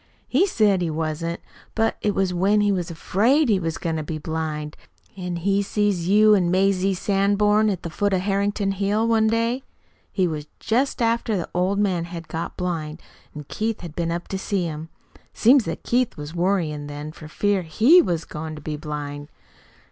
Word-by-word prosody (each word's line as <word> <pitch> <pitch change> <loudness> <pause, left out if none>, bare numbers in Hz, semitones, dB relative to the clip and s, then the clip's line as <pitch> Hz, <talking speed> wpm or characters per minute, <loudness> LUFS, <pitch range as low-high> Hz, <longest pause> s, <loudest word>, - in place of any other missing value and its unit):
He 330 +10 +3
said 210 - +2
he 170 - 0
wasn't. 160 +2 -3 0.3
But, 225 0 +1
it 205 -1 0
was 190 -2 +1
when 195 +4 +3
he 205 0 +3
was 180 -2 -1
'fraid 235 - +2
he 200 -3 +3
was 165 -2 -3
goin' 165 -4 -2
to 155 - -3
be 155 +1 -4
blind; 155 -1 -4 0.4
an' 180 -2 -4
he 195 +4 +1
see 205 +1 +1
you 200 +4 +4
an' 180 -4 +3
Mazie 190 +1 +2
Sanborn 205 +3 +2
at 190 -4 -3
the 170 - -5
foot 205 +4 0
of 190 -1 +1
Harrington 200 +1 0
Hill, 205 +3 0
one 225 -1 +3
day. 230 +3 0 0.5
It 185 -3 +2
was 150 -1 -5
just 250 +2 0
after 230 -2 +1
the 175 - -3
old 185 +3 +1
man 185 -5 +1
had 170 -1 -8
got 165 +1 -5
blind, 165 -4 -3 0.4
an' 150 -1 -7
Keith 220 0 -3
had 170 -4 -8
been 170 -1 -1
up 170 +1 -4
to 190 - -3
see 195 -1 -1
him. 160 -1 -5 0.3
It - - -20 0.2
seems 250 +1 +5
that 165 -1 -5
Keith 245 0 0
was 150 +1 -7
worryin' 170 -5 0
then 145 +1 -6
for 155 -1 -11
fear 200 +4 0
HE 225 - +5
was 170 - -2
goin' 155 +1 -6
to 150 - -10
be 150 +1 -4
blind." 145 -1 -6
185 Hz, 195 wpm, -23 LUFS, 160-205 Hz, 0.5 s, seems